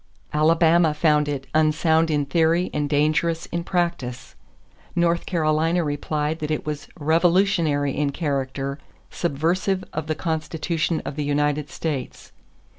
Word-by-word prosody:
Alabama 160 Hz, +1 st, +4 dB
found 150 Hz, -1 st, +3 dB
it 135 Hz, -2 st, -3 dB
"unsound 160 Hz, +1 st, +3 dB
in 145 Hz, -2 st, +1 dB
theory 165 Hz, +4 st, +2 dB
and 145 Hz, -1 st, -1 dB
dangerous 155 Hz, +3 st, +1 dB
in 170 Hz, 0 st, -2 dB
practice." 155 Hz, -, -2 dB, 0.6 s
North 170 Hz, 0 st, +1 dB
Carolina 165 Hz, 0 st, +1 dB
replied 150 Hz, +1 st, -2 dB
that 150 Hz, -, -3 dB
it 155 Hz, -, -2 dB
was 150 Hz, -1 st, -4 dB
"revolutionary 165 Hz, -2 st, +2 dB
in 145 Hz, -1 st, 0 dB
character, 140 Hz, -2 st, -3 dB, 0.3 s
subversive 175 Hz, +5 st, 0 dB
of 155 Hz, 0 st, -4 dB
the 155 Hz, -, -1 dB
Constitution 160 Hz, 0 st, -2 dB
of 140 Hz, -, -5 dB
the 150 Hz, -, -1 dB
United 145 Hz, 0 st, 0 dB
States." 145 Hz, -6 st, -5 dB
155 Hz, 125 wpm, -23 LUFS, 145-170 Hz, 0.6 s, Alabama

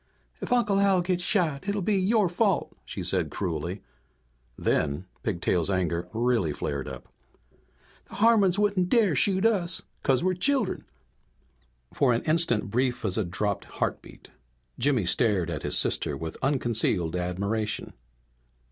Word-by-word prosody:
"If -, -, -5 dB
Uncle 215 Hz, -5 st, +3 dB
Al 195 Hz, -2 st, +4 dB
gets 175 Hz, 0 st, -1 dB
shot 175 Hz, -3 st, 0 dB
it'll 200 Hz, -1 st, -1 dB
be 210 Hz, +3 st, +1 dB
your 200 Hz, +2 st, +3 dB
fault," 195 Hz, +2 st, 0 dB
she -, -, -6 dB
said -, -, 0 dB
cruelly. 85 Hz, +1 st, -4 dB, 0.7 s
Then 70 Hz, +6 st, 0 dB, 0.2 s
Pigtail's 90 Hz, -3 st, 0 dB
anger 90 Hz, -2 st, -1 dB
really 115 Hz, -7 st, +1 dB
flared 70 Hz, -1 st, -3 dB
up. -, -, -8 dB, 1.0 s
"The -, -, -10 dB
Harmons 205 Hz, -4 st, +4 dB
wouldn't 200 Hz, -3 st, +1 dB
dare 215 Hz, -, +3 dB
shoot 190 Hz, +7 st, +2 dB
us 185 Hz, -6 st, +2 dB, 0.2 s
'cause 130 Hz, +1 st, +2 dB
we're 185 Hz, 0 st, +2 dB
children!" 245 Hz, +3 st, 0 dB, 1.1 s
For 130 Hz, -4 st, +3 dB
an 115 Hz, -, -1 dB
instant 155 Hz, -11 st, +1 dB
brief 125 Hz, 0 st, 0 dB
as 95 Hz, -3 st, 0 dB
a 110 Hz, -, +1 dB
dropped 100 Hz, +3 st, -2 dB
heartbeat -, -, -5 dB, 0.5 s
Jimmy 130 Hz, -6 st, +2 dB
stared 90 Hz, -1 st, +1 dB
at 75 Hz, -, -4 dB
his -, -, -2 dB
sister -, -, -1 dB
with 80 Hz, 0 st, -6 dB
unconcealed 115 Hz, -, 0 dB
admiration. 100 Hz, +5 st, -2 dB
130 Hz, 140 wpm, -27 LUFS, -, 1.1 s, Al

